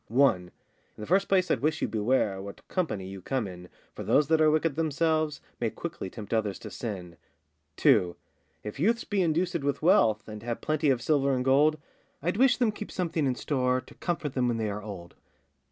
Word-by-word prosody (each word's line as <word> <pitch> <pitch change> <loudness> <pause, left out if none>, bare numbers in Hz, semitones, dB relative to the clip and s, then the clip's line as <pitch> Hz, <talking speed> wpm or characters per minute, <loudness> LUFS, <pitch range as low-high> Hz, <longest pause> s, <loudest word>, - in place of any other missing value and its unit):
1. 115 -8 +3 0.5
I' 105 - -7
th' - - -7
first 195 +2 +2
place 185 -2 +3
I'd - - +2
wish 155 +2 0
you - - 0
beware 105 -2 0
What 100 +1 -10
company 110 - -2
you 95 0 -8
come 125 +2 -2
in, 90 -1 -10 0.2
For - - -8
those 150 0 +3
that 160 -1 +4
are 155 - +6
wicked 155 -1 +1
themselves 155 -1 0 0.2
May - - 0
quickly 95 - -6
tempt 105 +1 -7
others 105 -3 0
to - - -9
sin. 90 -7 -6 0.6
2. 90 -1 +4 0.5
If 105 +5 -7
youths 230 +8 +2
be 205 -2 -2
inducèd 170 0 +1
with 140 +1 -2
wealth, 115 - +4
And 105 -1 -8
have 115 +1 -3
plenty 155 -1 0
of 125 -3 +1
silver 140 -2 +2
and 125 0 -2
gold, 145 +4 +4 0.4
I'd 175 +6 -1
wish 255 +1 +5
them 240 -4 +2
keep 210 0 -8
something 165 -5 -1
in 130 - 0
store, 125 0 0
To - - -14
comfort 165 -5 -3
them 125 -2 +1
when 120 -1 0
they 110 -2 -1
are 105 +1 -5
old. 95 -5 -8
135 Hz, 205 wpm, -28 LUFS, 105-160 Hz, 0.6 s, are